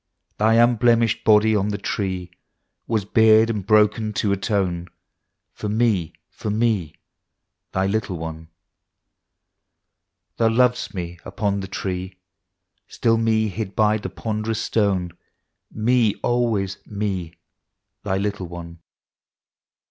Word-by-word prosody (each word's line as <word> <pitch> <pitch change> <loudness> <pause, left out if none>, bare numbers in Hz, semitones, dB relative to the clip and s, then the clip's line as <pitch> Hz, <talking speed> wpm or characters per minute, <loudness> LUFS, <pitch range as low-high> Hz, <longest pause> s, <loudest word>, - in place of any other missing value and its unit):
Thy 110 +2 +4
unblemished 115 -1 +3
Body 110 0 +5
on 100 -1 +1
the 105 -1 -2
Tree 95 -3 -3 0.6
^Ya8 105 -3 -2
bared 110 -1 +6
and 105 -3 -3
broken 110 0 +3
to 100 0 0
atone 95 -4 -1 0.7
For 105 - -5
me, 105 -7 +1 0.2
for - - -5
me 105 -7 0 0.8
Thy 95 0 0
little 100 -2 -1
one. 80 0 -7 1.9
Thou 115 - +3
lovedst 125 -1 +1
me 85 -1 -5
upon 100 -2 -2
the 95 - -5
Tree, 95 0 -4 0.3
— - - -57 0.3
Still 115 -1 +1
me, 110 -1 +2
hid 100 0 -5
by 110 0 +3
the 95 - -5
ponderous 110 +3 -3
stone, 95 -5 0 0.3
— - - -54 0.2
Me 120 -5 +3
always, 110 -6 0
— - - -40
me 95 -5 -3 0.7
Thy 95 -2 -1
little 100 -2 -2
one. 85 0 -9
105 Hz, 125 wpm, -22 LUFS, 95-110 Hz, 1.9 s, bared